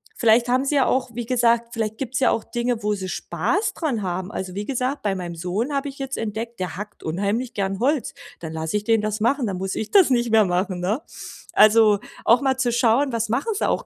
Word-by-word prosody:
vielleicht 235 +1 +4
haben 255 +2 +2
sie 290 - 0
ja 270 -3 +4
auch 255 -2 0
wie 240 0 -4
gesagt, 235 -1 +2
vielleicht 220 -2 -2
gibt's 260 -1 -2
ja 255 - +4
auch 225 - -1
Dinge, 240 -1 -2
wo 210 0 0
sie 190 -2 -5
Spaß 405 - -1
dran 275 -10 -2
haben. 185 +1 -3
Also, 185 -3 -5
wie 205 +1 -3
gesagt, 260 +2 -2
bei 200 -2 0
meinem 175 -2 -5
Sohn 185 - -2
habe 280 0 -1
ich 275 - -12
jetzt 270 0 -4
entdeckt, 225 +1 -4
der 180 -3 -3
hackt 210 +1 -8
unheimlich 200 +9 -2
gern 195 -1 -2
Holz. 280 +1 +1 0.3
Dann 160 -1 -7
lasse 160 +4 -2
ich 205 - -4
den 225 -1 +3
das 215 0 -2
machen, 250 +4 +1
dann 190 -2 -3
muss 190 +1 -3
ich 220 - -4
das 385 -7 +6
nicht 240 -3 +1
mehr 220 -1 +5
machen, 180 0 -1
ne? 205 +10 -1 0.5
Also, 215 -1 +6 0.3
auch 235 +2 +5
mal 265 -1 +1
zu 255 -2 +1
schauen, 240 +3 +2
was 230 -1 -1
machen 270 - 0
sie - - 0
auch - - -1
225 Hz, 240 wpm, -23 LUFS, 200-255 Hz, 0.5 s, das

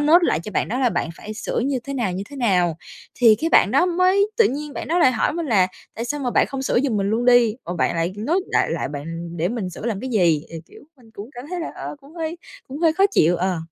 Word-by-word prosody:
note 305 +4 +6
lại 165 - +1
cho 190 - -8
bạn - - 0
đó 245 +4 -2
là 255 - +3
bạn - - -1
phải 215 - -8
sửa 215 - -3
như 275 -2 0
thế 275 - -5
nào, 235 -8 -1
như 185 +2 -4
thế 285 - -9
nào. 180 - +1 0.4
Thì 230 -3 +6
cái 320 +9 -2
bạn - - +5
đó 350 - +3
mới 370 +3 +2
tự 460 - +5
nhiên 295 +2 -5
bạn - - -6
đó 345 +3 +1
lại 260 -6 +5
hỏi 220 - 0
mình 335 0 -3
là: 200 -8 +3 0.3
"Tại 230 - -4
sao 290 +4 -3
mà 250 - -1
bạn - - +3
không 270 -1 -5
sửa 255 - +1
giùm 260 -5 0
mình 200 0 0
luôn 230 +3 0
đi, 245 -3 +5
mà 175 - -4
bạn - - +1
lại 165 +2 -1 0.2
note 365 +3 +1
đại - - +2
lại - - -2
bạn 165 +4 -6
để 170 +2 0
mình 210 -6 -3
sửa 195 - -7
làm 215 -4 -2
cái 260 - -5
gì?" 170 -9 +2
Thì, 165 - -7
kiểu, - - -16 0.2
mình 235 -4 -20
cũng 210 +4 -9
cảm 245 - -8
thấy 360 -1 -3
là, 330 - -4
ơ, - - -7
cũng 285 +3 -17
hơi 330 0 -4 0.3
cũng 270 +2 -7
hơi 325 -1 +3
khó 385 +4 +2
chịu, 170 +3 +3
ờ. 185 0 -1
245 Hz, 290 wpm, -22 LUFS, 190-295 Hz, 0.4 s, note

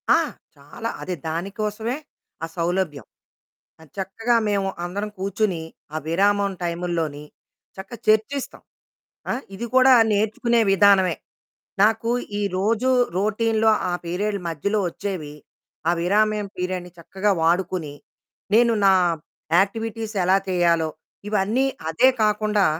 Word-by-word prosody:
ఆ! - - +6 0.4
చాలా 150 +11 -7
అదే 180 - -3
దానికోసమే 210 - -3 0.5
ఆ - - +1
సౌలభ్యం. 170 -4 -1 0.8
అది 155 -4 -18
చక్కగా 225 +5 0
మేము 200 -1 0 0.2
అందరం 200 +4 -4
కూర్చొని, 195 -2 -1 0.3
ఆ - - 0
విరామం 200 +4 +2
టైముల్లోని, 170 -4 -2 0.5
చక్కగా 195 +4 -8
చర్చిస్తాం. 220 +6 +1 0.7
ఆ! - - +1 0.2
ఇది 230 +5 -4
కూడా 260 0 +7 0.2
నేర్చుకునే 220 +3 +1
విధానమే. 195 -2 +5 0.7
నాకు 225 +2 +2 0.3
ఈ - - -1 0.2
రోజు 225 +6 +1 0.3
రొటీన్‌లో 220 +2 +2 0.2
ఆ - - -1
పీరియడ్ 200 +4 -2
మధ్యలో 200 +7 -1
ఓచ్చేవి, 175 -5 -5 0.6
ఆ - - +5
విరామ్యం 210 +3 +2
పీరియడ్ని 180 0 -3
చక్కగా 195 +5 -1
వాడుకుని, 170 -2 0 0.6
నేను 235 0 +5
నా 195 - +7 0.7
యాక్టివిటీస్ 225 +2 -2
ఎలా 185 +2 +4
తేయాలో 170 -3 +2 0.4
ఇవన్నీ 210 +6 +1 0.2
అదే 165 +11 +4 0.2
కాకుండా 210 -1 +2
200 Hz, 110 wpm, -23 LUFS, 175-215 Hz, 0.8 s, కూడా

